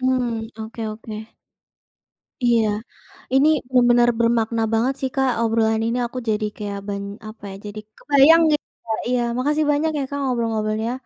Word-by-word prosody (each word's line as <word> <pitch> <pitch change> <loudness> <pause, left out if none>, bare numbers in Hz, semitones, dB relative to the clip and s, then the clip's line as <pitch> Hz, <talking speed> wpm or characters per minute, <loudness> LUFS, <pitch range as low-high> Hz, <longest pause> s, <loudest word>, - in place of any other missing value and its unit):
Hmm. 245 -3 0 0.2
Oke 225 +1 -8
oke. 215 0 -8 1.1
Iya, 235 -2 +3 0.7
ini 275 +3 +5 0.4
benar 240 0 +5
bermakna 230 -1 +1
banget 240 +4 +2
sih 265 - 0
Kak, 265 -1 +2
obrolan 225 -1 +2
ini 235 +2 -1
aku 245 +2 -7
jadi 215 0 0
kayak 205 -1 -4
ban 200 0 -3 0.2
apa 215 -1 -12
ya? 195 - -8
Jadi 215 +1 -7 0.2
kebayang 295 +4 +6
gitu, 295 - -1 0.2
Kak. 220 -1 -2
Iya. 250 -1 +1 0.2
Makasih 300 +4 +1
banyak 310 +2 +1
ya 280 - -1
Kak, 285 0 -4
ngobrol-ngobrolnya. 225 -3 -1
230 Hz, 150 wpm, -22 LUFS, 220-260 Hz, 1.1 s, kebayang